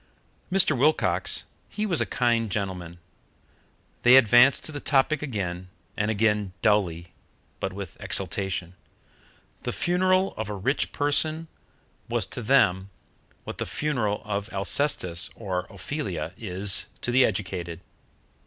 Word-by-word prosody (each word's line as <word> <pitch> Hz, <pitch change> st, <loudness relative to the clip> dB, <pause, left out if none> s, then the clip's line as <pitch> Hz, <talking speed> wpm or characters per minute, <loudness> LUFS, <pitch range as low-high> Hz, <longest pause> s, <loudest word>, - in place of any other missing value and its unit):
Mr. 180 Hz, -5 st, +5 dB
Wilcox, 120 Hz, -, +1 dB, 0.3 s
he 210 Hz, +1 st, -3 dB
was 180 Hz, -7 st, +2 dB
a -, -, 0 dB
kind 115 Hz, -3 st, +1 dB
gentleman. 90 Hz, -4 st, -4 dB, 1.0 s
They 125 Hz, +1 st, +7 dB
advanced 120 Hz, +2 st, +6 dB
to -, -, -2 dB
the 145 Hz, -, -5 dB
topic 145 Hz, +2 st, +2 dB
again 95 Hz, -9 st, -4 dB, 0.3 s
and 105 Hz, +1 st, -1 dB
again, 105 Hz, -3 st, +1 dB
dully, 85 Hz, -5 st, +1 dB, 0.5 s
but 95 Hz, -, -2 dB
with 95 Hz, -3 st, -9 dB
exaltation. 95 Hz, -3 st, -3 dB, 0.9 s
The -, -, -3 dB
funeral 185 Hz, +2 st, +1 dB
of 110 Hz, -1 st, -4 dB
a 105 Hz, -, -4 dB
rich 130 Hz, +9 st, -1 dB
person 155 Hz, +3 st, +1 dB, 0.6 s
was -, -, 0 dB
to -, -, -4 dB
them 100 Hz, -6 st, +3 dB, 0.5 s
what -, -, -8 dB
the -, -, -2 dB
funeral 120 Hz, -9 st, -2 dB
of 100 Hz, 0 st, -3 dB
Alcestis 95 Hz, -, 0 dB
or 95 Hz, -4 st, -4 dB
Ophelia 95 Hz, -, -5 dB
is 95 Hz, -2 st, +2 dB
to 120 Hz, -, -2 dB
the 130 Hz, +1 st, +5 dB
educated. 95 Hz, -6 st, -2 dB
105 Hz, 125 wpm, -26 LUFS, 95-140 Hz, 1.0 s, They